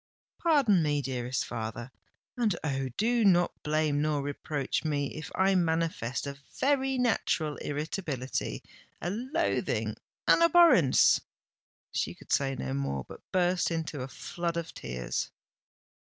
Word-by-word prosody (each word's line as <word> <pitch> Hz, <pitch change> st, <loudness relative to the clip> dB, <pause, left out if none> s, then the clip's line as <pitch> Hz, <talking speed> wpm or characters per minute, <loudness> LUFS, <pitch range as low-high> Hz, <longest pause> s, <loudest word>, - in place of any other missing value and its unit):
"Pardon 275 Hz, -, +4 dB
me, 150 Hz, -2 st, +1 dB
dearest 125 Hz, -2 st, -2 dB
father—and, 120 Hz, -, -4 dB
oh! 135 Hz, -3 st, -1 dB
do 235 Hz, +2 st, +2 dB
not 175 Hz, -3 st, +4 dB
blame 150 Hz, -1 st, +1 dB
nor 150 Hz, -2 st, 0 dB
reproach 145 Hz, -1 st, -2 dB
me 145 Hz, -3 st, -1 dB
if 155 Hz, -, -7 dB
I 190 Hz, +1 st, +3 dB
manifest 165 Hz, -9 st, 0 dB
a 140 Hz, 0 st, -6 dB, 0.2 s
very 270 Hz, -1 st, +2 dB
natural 175 Hz, -, +1 dB
irritability—a 145 Hz, -, -4 dB
loathing—an 265 Hz, -, 0 dB
abhorrence——" 335 Hz, -, +6 dB, 0.7 s
She -, -, -2 dB
could -, -, -14 dB
say 135 Hz, -1 st, +2 dB
no 65 Hz, -, -4 dB
more, 70 Hz, -1 st, -2 dB
but -, -, -11 dB
burst 180 Hz, -1 st, +2 dB
into 160 Hz, -4 st, -3 dB
a 130 Hz, -, -4 dB
flood 170 Hz, +5 st, -4 dB
of 170 Hz, -1 st, -4 dB
tears. 60 Hz, -1 st, -3 dB
155 Hz, 120 wpm, -29 LUFS, 135-195 Hz, 0.7 s, abhorrence